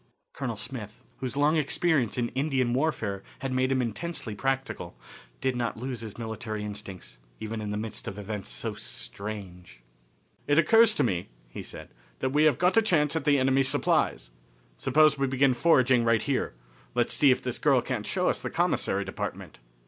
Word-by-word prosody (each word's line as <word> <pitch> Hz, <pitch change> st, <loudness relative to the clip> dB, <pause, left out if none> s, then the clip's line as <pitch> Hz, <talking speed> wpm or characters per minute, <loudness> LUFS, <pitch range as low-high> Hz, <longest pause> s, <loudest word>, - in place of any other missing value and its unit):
Colonel 120 Hz, -5 st, -4 dB
Smith, 110 Hz, -1 st, -8 dB
whose 130 Hz, +1 st, -4 dB
long 150 Hz, +3 st, +3 dB
experience 150 Hz, -4 st, +1 dB
in 120 Hz, -1 st, 0 dB
Indian 130 Hz, -3 st, 0 dB
warfare 120 Hz, -9 st, -1 dB, 0.2 s
had 135 Hz, -1 st, -2 dB
made 130 Hz, +1 st, +1 dB
him 130 Hz, -1 st, +2 dB
intensely 120 Hz, 0 st, -4 dB
practical, 135 Hz, +5 st, -3 dB, 0.4 s
did 130 Hz, -1 st, 0 dB
not 120 Hz, -2 st, -2 dB
lose 125 Hz, -1 st, -4 dB
his 110 Hz, -3 st, -8 dB
military 110 Hz, -2 st, -4 dB
instincts, 100 Hz, -11 st, -8 dB, 0.2 s
even 110 Hz, 0 st, -4 dB
in 105 Hz, -, -4 dB
the 105 Hz, -, -2 dB
midst 110 Hz, 0 st, -4 dB
of 95 Hz, -, -5 dB
events 105 Hz, 0 st, -5 dB
so -, -, -4 dB
strange. 95 Hz, -, -7 dB, 0.7 s
"It 145 Hz, -, +3 dB
occurs 220 Hz, +6 st, +6 dB
to 145 Hz, -, +2 dB
me," 90 Hz, -8 st, -1 dB, 0.2 s
he -, -, -7 dB
said, -, -, -9 dB, 0.3 s
"that 130 Hz, -, -1 dB
we 150 Hz, +2 st, +4 dB
have 150 Hz, -5 st, +4 dB
got 180 Hz, +4 st, +2 dB
a -, -, +8 dB
chance 160 Hz, -8 st, +2 dB
at 160 Hz, -, -1 dB
the 145 Hz, -2 st, +5 dB
enemies' 135 Hz, 0 st, +3 dB
supplies. -, -, +1 dB, 0.4 s
Suppose 150 Hz, -, +4 dB
we 135 Hz, -, +2 dB
begin 135 Hz, 0 st, +3 dB
foraging 130 Hz, -3 st, +4 dB
right 115 Hz, -1 st, +3 dB
here. 135 Hz, -, -1 dB, 0.4 s
Let's -, -, +2 dB
see 145 Hz, -, +5 dB
if 130 Hz, 0 st, +3 dB
this -, -, -3 dB
girl -, -, +4 dB
can't -, -, -3 dB
show -, -, 0 dB
us -, -, +1 dB
the -, -, -3 dB
commissary -, -, 0 dB
department." -, -, -6 dB
130 Hz, 180 wpm, -28 LUFS, 105-145 Hz, 0.7 s, a